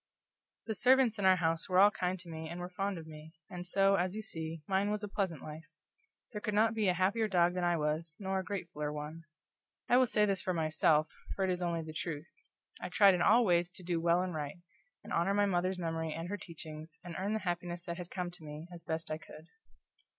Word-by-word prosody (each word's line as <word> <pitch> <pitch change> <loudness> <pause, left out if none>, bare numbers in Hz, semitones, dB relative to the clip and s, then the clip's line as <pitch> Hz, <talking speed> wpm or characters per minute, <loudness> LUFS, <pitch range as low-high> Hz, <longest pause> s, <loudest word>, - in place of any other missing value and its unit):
The 220 - -2
servants 250 -1 +4
in 195 - 0
our 190 0 +7
house 165 -1 0
were 185 - +2
all 200 +2 +8
kind 185 -2 -1
to 175 -1 -12
me 160 -1 -6
and 170 +2 -6
were 180 +1 -5
fond 195 +1 -2
of 165 - -8
me, 155 0 -11 0.2
and 180 -1 -6
so, 195 +1 +4
as 180 +2 0
you 220 - -4
see, 160 -5 -5
mine 195 +1 +2
was 210 0 -2
a - - -2
pleasant 190 -7 -2
life. 155 +1 -8 0.7
There 210 -3 -5
could 210 -2 -2
not 220 +2 +4
be 215 -3 +1
a 180 - +3
happier 200 +5 +2
dog 175 -3 +3
that 180 -1 -2
I 175 -1 +2
was, 155 +1 -1
nor 190 -1 -1
a - - -3
gratefuller 170 -7 -4
one. 150 +2 -6 0.6
I 245 - +5
will 255 0 +5
say 210 -2 +3
this 195 -3 0
for 185 - -1
myself, 155 -1 +2 0.2
for 195 - -1
it 185 - +1
is 180 0 -2
only 170 -2 -1
the 155 0 -8
truth: 155 -1 -4 0.6
I - - -4
tried 200 -2 +6
in 180 - 0
all 230 +6 +6
ways 175 -2 +3
to 180 0 -12
do 170 -1 -1
well 170 +2 +3
and 185 -1 -3
right, 150 +3 -4 0.5
and - - -7
honor 185 +4 +2
my 205 0 +4
mother's 185 -1 0
memory 165 -2 -2
and 165 +3 -5
her 205 - -2
teachings, 160 -2 -9
and 175 -1 -7
earn 200 +3 -1
the 220 - -1
happiness 175 0 -3
that 170 -2 -5
had 180 -1 -7
come 180 -1 -3
to 175 -2 -13
me, 150 +1 -7
as 170 - -8
best 160 0 -3
I 155 - -2
could. 155 +1 -13
175 Hz, 245 wpm, -33 LUFS, 165-195 Hz, 0.7 s, all